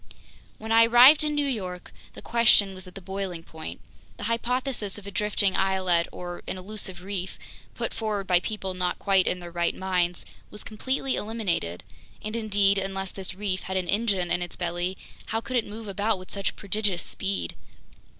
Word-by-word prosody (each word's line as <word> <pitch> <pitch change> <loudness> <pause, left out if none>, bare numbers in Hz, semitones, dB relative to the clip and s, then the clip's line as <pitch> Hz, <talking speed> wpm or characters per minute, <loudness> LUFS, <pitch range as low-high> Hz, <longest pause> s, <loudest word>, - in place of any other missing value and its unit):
When 220 +1 -6
I 230 0 +8
arrived 255 +6 +9
in 300 -1 0
New 290 -1 +2
York, 185 -9 -4 0.2
the - - -11
question 220 -4 +5
was 185 -1 -10
at 180 - -13
the 195 - -8
boiling 190 -2 -4
point. 160 - -8 0.4
The - - -7
hypothesis 235 -1 -1
of 205 - -11
a 200 - -6
drifting 205 -1 +3
islet 185 -3 +2
or 175 -1 -6
an - - -3
elusive 190 -1 -4
reef, 190 -1 -4 0.4
put - - -3
forward 210 -3 -2
by 180 -1 +4
people 190 -1 -4
not 180 -1 -1
quite 195 -2 +3
in 180 - 0
their 175 -1 -8
right 170 0 0
minds, 180 -2 0 0.2
was 210 - -7
completely 260 +4 -1
eliminated. 195 - -2 0.4
And 215 +1 -4
indeed, 205 -3 +3
unless 195 -1 -3
this 190 -2 -4
reef 190 -2 -2
had 190 0 -3
an 185 -1 -1
engine 200 -4 +1
in 180 - +2
its 175 - -4
belly, 175 +1 -2 0.3
how 225 - 0
could 255 +3 -5
it 235 - +2
move 215 +1 -8
about 205 +2 0
with 185 0 -12
such 200 -1 -2
prodigious 200 -3 0
speed? 90 -4 -2
195 Hz, 185 wpm, -27 LUFS, 180-215 Hz, 0.4 s, arrived